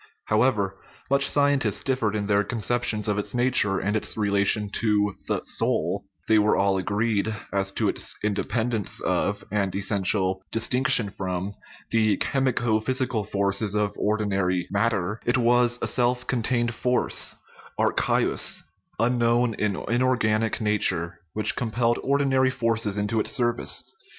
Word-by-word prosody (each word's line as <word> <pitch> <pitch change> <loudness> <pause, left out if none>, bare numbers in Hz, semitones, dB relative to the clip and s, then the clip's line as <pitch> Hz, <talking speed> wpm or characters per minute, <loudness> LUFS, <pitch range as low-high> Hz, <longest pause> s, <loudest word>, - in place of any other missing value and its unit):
How 110 0 +1
ever 100 -6 0 0.3
much 140 0 +3
scientists 140 -8 +2
differed 125 -6 -1
in 105 -1 -2
their 100 0 +2
conceptions 115 -1 0
of 105 -1 0
its 105 +2 -3
i - - -1
nature 120 -6 +2
and 105 +2 -1
its 110 - -2
relation 100 0 +1
to 105 -3 +1
the - - -1
"soul," - - -1 0.2
they 110 -1 +4
were 105 0 +3
all 100 -1 +2
agreed 105 +2 -1 0.2
as 95 0 0
to - - 0
its - - 0
independence 110 +1 -1
of, 100 0 -1
and 100 -3 -1
essential 95 -1 +1
distinc 125 +4 0
tion 115 -7 +5
from, 95 +1 -4 0.4
the 110 -2 +2
chemico 120 -5 0
physical 130 -4 0
forces 100 +1 -1
of 105 -1 0
ordinary 100 -4 0
" - - -19
mat 100 +4 +2
ter 100 0 -3
"; - - -27
it 120 - +2
was 120 0 +3
a - - +1
self 125 0 +1
contained 120 -1 0
force 125 +2 +1 0.4
(archaeus), - - +1 0.3
unknown 120 0 +2
in 105 -2 -1
inorganic 115 -3 +1
nature, 95 -6 0
which 110 - +2
compelled 120 0 0
ordinary 135 -1 +2
forces 115 -4 -1
into 105 +2 -1
its - - -2
service. 120 -2 +1
110 Hz, 150 wpm, -24 LUFS, 100-120 Hz, 0.4 s, tion